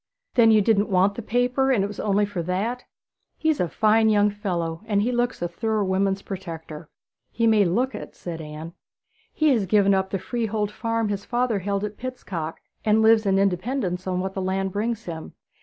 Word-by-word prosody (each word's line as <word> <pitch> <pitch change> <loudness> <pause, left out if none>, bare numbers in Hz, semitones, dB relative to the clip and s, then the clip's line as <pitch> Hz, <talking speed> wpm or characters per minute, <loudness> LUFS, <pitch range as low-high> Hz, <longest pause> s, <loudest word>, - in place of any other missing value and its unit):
'Then 230 -2 +6
you 215 -2 +5
didn't 210 -1 +2
want 190 +1 +3
the 235 - -6
paper 245 +4 +1
and 215 -7 +3
it - - 0
was 205 - -9
only 205 0 +2
for 200 -4 -4
that!' 200 +9 -2 0.5
'He's 315 -3 +1
a - - +2
very - - -7
fine 220 +3 +3
young 210 -1 +4
fellow; 175 -5 -3
he 210 +3 +1
looks 245 -5 -1
a - - +1
thorough 215 +4 -1
woman's 195 +1 0
protector.' 165 -5 -7 0.4
'He 230 - -1
may 215 -3 +5
look 240 +10 0
it,' - - -8
said 165 -2 -6
Anne. 155 +2 -8 0.6
'He 310 -1 +2
has 225 -8 +2
given 200 0 +4
up 190 0 +1
the 195 - -1
freehold 215 0 -2
farm 230 0 -1
his 200 -1 -3
father 240 -3 0
held 200 +1 -2
at 210 0 -4
Pitstock, 185 -11 -5 0.2
and 220 0 +3
lives 220 -1 +5
in 195 0 +3
independence 190 0 -1
on 180 -1 0
what 190 +1 -3
the 190 - -3
land 190 +1 -1
brings 220 +3 -2
him. 160 -2 -7
205 Hz, 200 wpm, -24 LUFS, 185-225 Hz, 0.6 s, Then